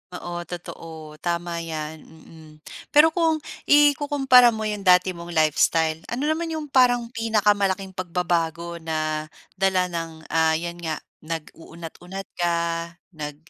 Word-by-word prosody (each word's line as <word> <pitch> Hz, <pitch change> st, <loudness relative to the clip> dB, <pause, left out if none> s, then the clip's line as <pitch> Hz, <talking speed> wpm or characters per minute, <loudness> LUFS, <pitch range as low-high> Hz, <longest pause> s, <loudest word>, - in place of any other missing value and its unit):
Oo 175 Hz, -1 st, -5 dB
totoo, 160 Hz, -3 st, -9 dB
tama 170 Hz, 0 st, -2 dB
'yan, 160 Hz, -1 st, -5 dB
mm. 160 Hz, -1 st, -16 dB, 0.4 s
Pero 315 Hz, +2 st, +7 dB
kung 320 Hz, -2 st, +1 dB, 0.2 s
ikukumpara 285 Hz, -4 st, +5 dB
mo 220 Hz, -, -4 dB
'yong 210 Hz, -2 st, -3 dB
dati 180 Hz, +1 st, +6 dB
mong 170 Hz, -1 st, -8 dB
lifestyle 160 Hz, +1 st, +2 dB
ano 245 Hz, +4 st, -3 dB
naman 330 Hz, +1 st, -2 dB
'yong 310 Hz, -3 st, -5 dB
parang 245 Hz, -2 st, +3 dB
pinakamalaking 205 Hz, -4 st, +1 dB
pagbabago 170 Hz, -2 st, -2 dB
na 155 Hz, -1 st, -2 dB, 0.3 s
dala 185 Hz, -2 st, +2 dB
ng, 165 Hz, -2 st, -5 dB
ah, 160 Hz, -1 st, +3 dB
'yan 170 Hz, +1 st, -4 dB
nga 160 Hz, -2 st, -3 dB, 0.2 s
nag-uunat-unat 165 Hz, +3 st, -8 dB, 0.2 s
ka, 175 Hz, -1 st, +2 dB, 0.6 s
nag 150 Hz, -3 st, -6 dB
175 Hz, 125 wpm, -24 LUFS, 160-220 Hz, 0.6 s, Pero